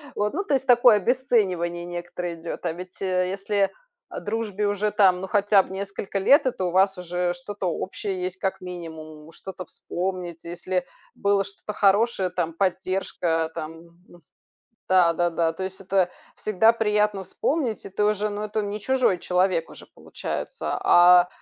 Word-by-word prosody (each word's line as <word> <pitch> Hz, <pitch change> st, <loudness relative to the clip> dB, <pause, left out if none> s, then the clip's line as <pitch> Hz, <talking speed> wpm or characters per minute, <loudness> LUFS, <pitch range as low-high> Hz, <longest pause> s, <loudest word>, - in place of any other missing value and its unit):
Вот, 210 Hz, 0 st, -1 dB
ну, 395 Hz, -, -1 dB
то 345 Hz, -, -2 dB
есть, 265 Hz, 0 st, -1 dB
такое 240 Hz, -2 st, +7 dB
обесценивание 190 Hz, -7 st, 0 dB
некоторое 175 Hz, 0 st, -5 dB
идёт. 165 Hz, +2 st, -7 dB
А 170 Hz, -, +1 dB
ведь, 180 Hz, +2 st, -10 dB
э, 185 Hz, -1 st, 0 dB
если, 195 Hz, 0 st, 0 dB, 0.4 s
а, -, -, -6 dB
дружбе 210 Hz, -1 st, -2 dB
уже 205 Hz, +1 st, 0 dB
там, 185 Hz, -4 st, +4 dB
ну, 190 Hz, -, -4 dB
хотя 205 Hz, 0 st, +4 dB
б -, -, -13 dB
несколько 195 Hz, 0 st, -4 dB
лет, 275 Hz, -, +5 dB
это 210 Hz, -7 st, -1 dB
у 175 Hz, -, -1 dB
вас 190 Hz, +2 st, +3 dB
уже 180 Hz, 0 st, -2 dB
что-то 190 Hz, +2 st, -5 dB
общее 185 Hz, +2 st, -3 dB
есть, 185 Hz, 0 st, -3 dB
как 190 Hz, 0 st, -2 dB
минимум, 160 Hz, -3 st, -9 dB
что-то 185 Hz, +2 st, -9 dB
вспомнить. 175 Hz, -2 st, -5 dB
Если 180 Hz, +1 st, -3 dB, 0.3 s
было 200 Hz, 0 st, +2 dB
что-то 200 Hz, +1 st, -8 dB
хорошее, 200 Hz, -1 st, +2 dB
там 175 Hz, -2 st, -2 dB
поддержка 180 Hz, -3 st, -1 dB
там, 160 Hz, +1 st, -6 dB, 0.3 s
ну 175 Hz, -, -18 dB, 0.7 s
Да-да-да, 170 Hz, -2 st, +3 dB
то 190 Hz, -, -5 dB
есть 190 Hz, +1 st, -5 dB
это 190 Hz, -1 st, +1 dB, 0.3 s
всегда 215 Hz, +2 st, +4 dB
приятно 210 Hz, -3 st, +1 dB
вспомнить, 270 Hz, -, -1 dB
и -, -, -7 dB
ты 195 Hz, +2 st, -1 dB
уже, 210 Hz, 0 st, +1 dB
ну, 205 Hz, 0 st, -4 dB
это 215 Hz, +1 st, -2 dB
не 205 Hz, +1 st, -4 dB
чужой 255 Hz, -6 st, +2 dB
человек 180 Hz, -2 st, +1 dB
уже -, -, -12 dB
получается. -, -, -5 dB
А 175 Hz, 0 st, +7 dB
190 Hz, 165 wpm, -24 LUFS, 175-205 Hz, 0.7 s, такое